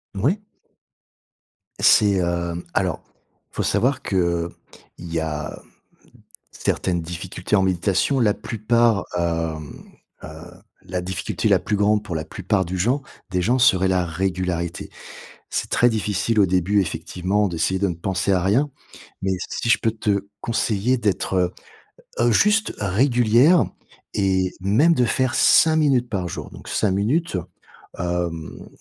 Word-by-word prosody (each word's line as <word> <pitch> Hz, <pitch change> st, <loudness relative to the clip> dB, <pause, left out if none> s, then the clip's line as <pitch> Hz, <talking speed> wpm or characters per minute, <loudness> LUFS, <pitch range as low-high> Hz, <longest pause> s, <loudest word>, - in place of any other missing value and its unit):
Oui. 150 Hz, -, 0 dB, 1.4 s
C'est, 100 Hz, -3 st, +5 dB
heu, 85 Hz, 0 st, -2 dB
alors, 90 Hz, -5 st, -1 dB, 0.5 s
faut -, -, -3 dB
savoir 130 Hz, +2 st, +1 dB
qu'il 85 Hz, -3 st, 0 dB, 0.5 s
y 85 Hz, -1 st, -3 dB
a 75 Hz, -1 st, -4 dB, 0.9 s
certaines 90 Hz, -2 st, -1 dB
difficultés 90 Hz, +3 st, -5 dB
en 95 Hz, -, +3 dB
méditation 95 Hz, +8 st, +1 dB
la 105 Hz, -4 st, +3 dB
plupart, 115 Hz, -1 st, +1 dB
hem 80 Hz, -3 st, -3 dB, 0.4 s
heu, -, -, -8 dB, 0.6 s
la 90 Hz, 0 st, -3 dB
difficulté 95 Hz, +1 st, -2 dB
la -, -, +5 dB
plus 105 Hz, -, -2 dB
grande 105 Hz, +1 st, +2 dB
pour 95 Hz, -5 st, -5 dB
la 80 Hz, 0 st, -3 dB
plupart 95 Hz, +1 st, -1 dB
du 90 Hz, +2 st, -4 dB
gens 120 Hz, +10 st, +1 dB, 0.3 s
des 90 Hz, -, 0 dB
gens 120 Hz, +8 st, +2 dB
serait 95 Hz, -7 st, +4 dB
la 90 Hz, -1 st, +1 dB
régularité. 90 Hz, 0 st, -3 dB, 0.6 s
C'est -, -, -3 dB
très 120 Hz, -, +4 dB
difficile 110 Hz, 0 st, -1 dB
au 100 Hz, -, +6 dB
début, 95 Hz, +3 st, +2 dB
effectivement, 95 Hz, +4 st, -1 dB
d'essayer 90 Hz, +2 st, -1 dB
de 100 Hz, -, +2 dB
ne 90 Hz, -, -2 dB
penser 95 Hz, +3 st, -1 dB
à 90 Hz, -2 st, +2 dB
rien, 120 Hz, +11 st, +2 dB, 0.5 s
mais 95 Hz, -, 0 dB, 0.2 s
si -, -, -3 dB
je -, -, +5 dB
peux 115 Hz, -, 0 dB
te 100 Hz, -3 st, -1 dB
conseiller 115 Hz, +2 st, 0 dB
d'être, 100 Hz, -3 st, -1 dB
heu, 90 Hz, 0 st, +1 dB, 0.7 s
heu, 120 Hz, 0 st, +4 dB
juste 210 Hz, -, +3 dB
régulière 120 Hz, -, +4 dB, 0.5 s
et 95 Hz, -2 st, +1 dB
même 125 Hz, -, +3 dB
de 125 Hz, -, +2 dB
faire 130 Hz, +1 st, 0 dB
5 160 Hz, -1 st, +5 dB
minutes 135 Hz, -6 st, +2 dB
par 95 Hz, -5 st, -2 dB
jour, -, -, -6 dB
donc -, -, -12 dB
5 105 Hz, -, +1 dB
minutes, 120 Hz, -, 0 dB, 0.6 s
hem, 85 Hz, -2 st, -4 dB
95 Hz, 140 wpm, -22 LUFS, 90-115 Hz, 1.4 s, au